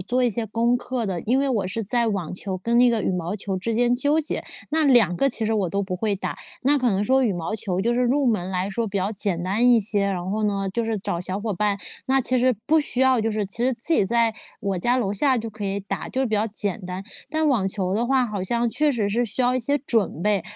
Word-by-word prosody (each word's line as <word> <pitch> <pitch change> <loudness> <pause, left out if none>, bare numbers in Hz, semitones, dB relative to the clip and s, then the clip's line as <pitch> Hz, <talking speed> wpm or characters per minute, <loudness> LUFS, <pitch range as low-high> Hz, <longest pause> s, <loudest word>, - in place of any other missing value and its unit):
做 245 +7 0
一 245 - +3
些 225 +1 -2
功 235 +3 +1
课 245 -1 -3
的， 185 -3 -2
因 255 +4 +1
为 275 - +1
我 215 -7 0
是 205 +5 -3
在 235 +3 +1
网 195 -7 -2
球 190 0 -3
跟 235 +6 0
那 245 0 +6
个 230 -3 +1
羽 - - 0
毛 180 +1 -3
球 195 -2 -3
之 225 +4 -2
间 245 +1 +2
纠 290 +4 +2
结， 310 - -4 0.3
那 315 0 +2
2 235 - +4
个 275 - +2
其 230 -4 0
实 225 - 0
我 200 -4 0
都 200 +2 -1
不 185 -2 -4
会 210 +1 0
打， 195 - -4 0.3
那 285 +3 +3
可 250 -3 +1
能 195 0 0
说 265 +3 +3
羽 215 - +1
毛 175 +3 -4
球， 190 -4 0
就 235 +4 +1
是 250 - +1
入 265 +3 +1
门 190 -6 0
来 185 +1 -1
说 225 +3 -2
比 200 0 -4
较 190 +3 -1
简 195 -4 0
单 210 +7 +2
一 235 -2 +5
些， 205 -1 +3
然 185 -2 -3
后 215 +2 -1
呢， 200 -1 -1
就 235 +1 -1
是 225 -2 -2
找 175 - -3
小 185 +2 -3
伙 215 0 -2
伴 205 +1 0 0.3
那 270 +1 +4
其 255 0 +2
实 255 +1 +3
不 320 +3 +4
需 275 -3 -1
要 260 -1 +4
就 225 +1 -1
是 210 -2 -2
其 195 - 0
实 260 - +2
自 245 +8 0
己 205 - +3
在 230 +1 +2 0.3
我 195 -2 -2
家 240 +8 +1
楼 200 -4 -1
下 260 +5 +3
就 225 0 -5
可 210 -1 -7
以 200 0 -2
打， 200 - -5
就 260 - -2
是 265 - +1
比 220 - -1
较 210 +2 +2
简 205 -1 -2
单。 185 +1 -5 0.3
但 315 -1 +1
网 230 -8 +1
球 190 -1 -1
的 230 +3 0
话， 260 -1 +2
好 205 -4 -4
像 235 +5 0
确 300 +6 +1
实 215 -5 -1
是 235 +4 0
需 225 +3 -1
要 250 +1 +2
一 255 - +1
些 285 +5 +1
准 225 - 0
备， 210 -2 +1
220 Hz, 300 characters per minute, -23 LUFS, 195-245 Hz, 0.3 s, 那